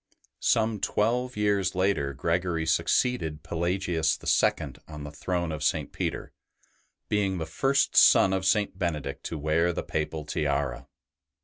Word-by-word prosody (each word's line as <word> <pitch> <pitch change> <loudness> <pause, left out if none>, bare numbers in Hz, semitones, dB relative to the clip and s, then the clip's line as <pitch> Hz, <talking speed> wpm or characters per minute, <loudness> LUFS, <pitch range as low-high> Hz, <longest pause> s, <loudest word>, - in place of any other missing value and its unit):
Some 110 -1 +1
twelve 120 +5 0
years 100 -3 +1
later 95 -7 +1
Gregory 85 +2 -1
succeeded 80 -5 0
Pelagius 85 -1 0
IL - - +1 0.2
on 75 -2 -8
the 75 - -7
throne 85 +2 -2
of 75 -1 -4
St. - - 0
Peter, - - -4 0.7
being 100 -3 0
the 80 - -3
first 135 +12 +1
son 95 - +6
of 95 0 -1
St. 100 0 +1
Benedict 75 -6 -3
to 80 - -4
wear 80 +3 +1
the - - -4
Papal 75 0 -3
tiara. 70 -4 -2
85 Hz, 135 wpm, -27 LUFS, 80-100 Hz, 0.7 s, son